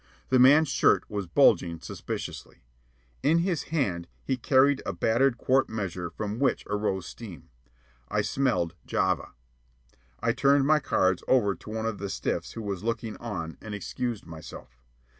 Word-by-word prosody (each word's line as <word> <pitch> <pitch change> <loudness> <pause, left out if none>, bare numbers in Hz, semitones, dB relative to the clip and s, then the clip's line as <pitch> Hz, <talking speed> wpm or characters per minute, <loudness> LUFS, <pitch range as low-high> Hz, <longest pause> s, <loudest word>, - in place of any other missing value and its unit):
The 130 - +4
man's 145 +4 +6
shirt - - +3
was 100 -3 -3
bulging 85 0 +3
suspiciously. - - -7 0.6
In 155 +4 +3
his 170 -2 0
hand 100 - -1 0.2
he 135 - 0
carried 135 +2 +3
a - - -3
battered 120 +2 +2
quart 130 +2 +2
measure 95 -5 -4
from 105 +5 -5
which 135 -1 +1
arose 105 -2 -1
steam. 105 -8 -10 0.6
I 105 - +1
smelled 105 -8 0
"Java." 95 -5 0 0.9
I - - +1
turned 140 0 +3
my 155 +1 +4
cards 95 - +1
over 110 -7 +3
to 105 - -13
one 110 0 -3
of 115 -3 -2
the 100 0 -4
stiffs - - -3
who 115 - -6
was 100 -2 -4
looking 115 -1 -2
on, 85 -8 -6
and 105 -1 -6
excused 115 +3 -4
myself. 70 -6 -11
110 Hz, 155 wpm, -27 LUFS, 95-130 Hz, 0.9 s, man's